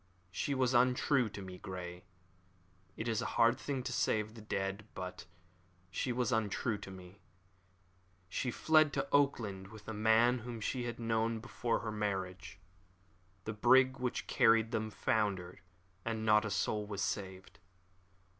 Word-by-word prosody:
She 140 Hz, +10 st, -1 dB
was 130 Hz, -1 st, +2 dB
untrue 125 Hz, 0 st, +3 dB
to 100 Hz, -1 st, -8 dB
me, 90 Hz, -1 st, -9 dB
Grey. 90 Hz, -2 st, -7 dB, 0.9 s
It 110 Hz, -, -3 dB
is 115 Hz, 0 st, 0 dB
a 110 Hz, -, -2 dB
hard 115 Hz, +2 st, +5 dB
thing 135 Hz, -2 st, -3 dB
to 125 Hz, -, -3 dB
say 110 Hz, -, +2 dB
of 105 Hz, 0 st, -5 dB
the 115 Hz, -, -11 dB
dead, 100 Hz, 0 st, -3 dB
but 90 Hz, -1 st, -6 dB, 0.6 s
she 125 Hz, -, -1 dB
was 125 Hz, 0 st, 0 dB
untrue 110 Hz, -1 st, 0 dB
to 100 Hz, -, -9 dB
me. 95 Hz, +1 st, -12 dB, 1.1 s
She 110 Hz, +7 st, -2 dB
fled 155 Hz, +4 st, +4 dB
to -, -, -1 dB
Auckland 110 Hz, -9 st, +1 dB
with 105 Hz, 0 st, -13 dB
a 110 Hz, -, -4 dB
man 110 Hz, +3 st, +4 dB
whom 120 Hz, 0 st, -6 dB
she 120 Hz, +3 st, -2 dB
had 120 Hz, 0 st, -5 dB
known 115 Hz, 0 st, 0 dB
before 115 Hz, +1 st, -2 dB
her 110 Hz, -, -3 dB
marriage. 95 Hz, -2 st, -3 dB, 0.9 s
The 110 Hz, -, -3 dB
brig 130 Hz, +4 st, +5 dB
which 125 Hz, -1 st, -2 dB
carried 115 Hz, 0 st, +4 dB
them 110 Hz, -2 st, -1 dB
foundered, 100 Hz, -4 st, -1 dB, 0.4 s
and 110 Hz, -1 st, -2 dB
not 105 Hz, 0 st, +5 dB
a -, -, -2 dB
soul 105 Hz, +2 st, -1 dB
was 100 Hz, -2 st, -3 dB
saved." 95 Hz, -3 st, -4 dB
110 Hz, 155 wpm, -34 LUFS, 100-120 Hz, 1.1 s, hard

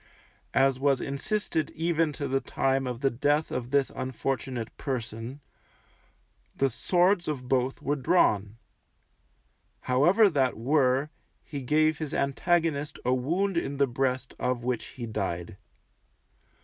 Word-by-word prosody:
As 135 Hz, -1 st, +3 dB
was 135 Hz, -1 st, +2 dB
insisted 155 Hz, -, -2 dB
even 165 Hz, -1 st, +1 dB
to 140 Hz, 0 st, -3 dB
the 135 Hz, 0 st, 0 dB
time 135 Hz, 0 st, 0 dB
of 125 Hz, 0 st, -4 dB
the 135 Hz, -1 st, +2 dB
death 145 Hz, +5 st, +1 dB
of 125 Hz, -1 st, -3 dB
this 140 Hz, 0 st, +2 dB
unfortunate 130 Hz, -2 st, -3 dB
person, 120 Hz, +1 st, -5 dB, 1.1 s
the 135 Hz, -1 st, +1 dB
swords 180 Hz, -, +2 dB
of 135 Hz, -5 st, -3 dB
both 130 Hz, 0 st, 0 dB
were 145 Hz, -, +1 dB
drawn; 110 Hz, -, +2 dB, 1.2 s
however 175 Hz, -, +4 dB
that 135 Hz, -, +1 dB
were, 135 Hz, +3 st, +2 dB, 0.3 s
he 140 Hz, -2 st, -6 dB
gave 155 Hz, +3 st, +2 dB
his 155 Hz, -3 st, -3 dB
antagonist 150 Hz, +1 st, 0 dB
a 125 Hz, -, +3 dB
wound 170 Hz, +9 st, 0 dB
in 140 Hz, -4 st, -2 dB
the 140 Hz, -, +4 dB
breast 130 Hz, +1 st, -1 dB
of 125 Hz, -1 st, -1 dB
which 125 Hz, -2 st, -1 dB
he 120 Hz, -, -7 dB
died. 95 Hz, -6 st, -3 dB
135 Hz, 130 wpm, -28 LUFS, 125-150 Hz, 1.2 s, however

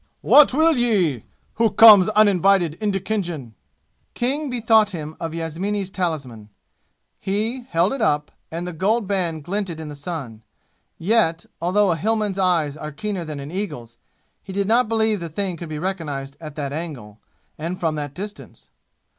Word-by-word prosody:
"What 295 Hz, -1 st, +7 dB
will 315 Hz, +2 st, +3 dB
ye? 190 Hz, -, +1 dB, 0.3 s
Who 230 Hz, 0 st, +3 dB
comes 215 Hz, -3 st, +8 dB
uninvited 195 Hz, -5 st, +3 dB
into 205 Hz, -2 st, 0 dB
Khinjan?" 175 Hz, -, -4 dB, 0.6 s
King 280 Hz, +4 st, -1 dB
bethought 225 Hz, -3 st, +3 dB
him 155 Hz, -2 st, -6 dB
of 165 Hz, -1 st, -4 dB
Yasmini's 185 Hz, +5 st, -3 dB
talisman. 140 Hz, -, -4 dB, 0.7 s
He, 220 Hz, +6 st, -2 dB
held 175 Hz, +6 st, +2 dB
it 270 Hz, -, -4 dB
up, 150 Hz, -8 st, +1 dB, 0.2 s
and 170 Hz, +2 st, -5 dB
the 180 Hz, -, -5 dB
gold 205 Hz, +7 st, +1 dB
band 175 Hz, -6 st, -2 dB
glinted 185 Hz, -1 st, -3 dB
in 155 Hz, -1 st, -6 dB
the 145 Hz, -, -8 dB
sun. 140 Hz, -7 st, -6 dB, 0.6 s
Yet, 175 Hz, -3 st, +1 dB, 0.2 s
although 190 Hz, +3 st, +2 dB
a 165 Hz, -, 0 dB
Hillman's 210 Hz, +1 st, -1 dB
eyes 170 Hz, -6 st, +1 dB
are 150 Hz, 0 st, -7 dB
keener 195 Hz, +4 st, -4 dB
than 155 Hz, -3 st, -6 dB
an 140 Hz, +2 st, -7 dB
eagle's, 170 Hz, -, -5 dB, 0.4 s
he 195 Hz, -, -10 dB
did 200 Hz, +1 st, -1 dB
not 230 Hz, +1 st, +3 dB
believe 220 Hz, -2 st, +1 dB
the 170 Hz, -1 st, -6 dB
thing 185 Hz, +2 st, -2 dB
could 170 Hz, -1 st, -8 dB
be 155 Hz, -, -4 dB
recognized 150 Hz, -6 st, -4 dB
at 155 Hz, -2 st, -8 dB
that 140 Hz, -2 st, -4 dB
angle, 135 Hz, -10 st, -6 dB, 0.4 s
and 170 Hz, +4 st, -4 dB
from 165 Hz, -2 st, 0 dB
that 145 Hz, -2 st, -5 dB
distance. 205 Hz, +3 st, -9 dB
180 Hz, 165 wpm, -22 LUFS, 155-210 Hz, 0.7 s, comes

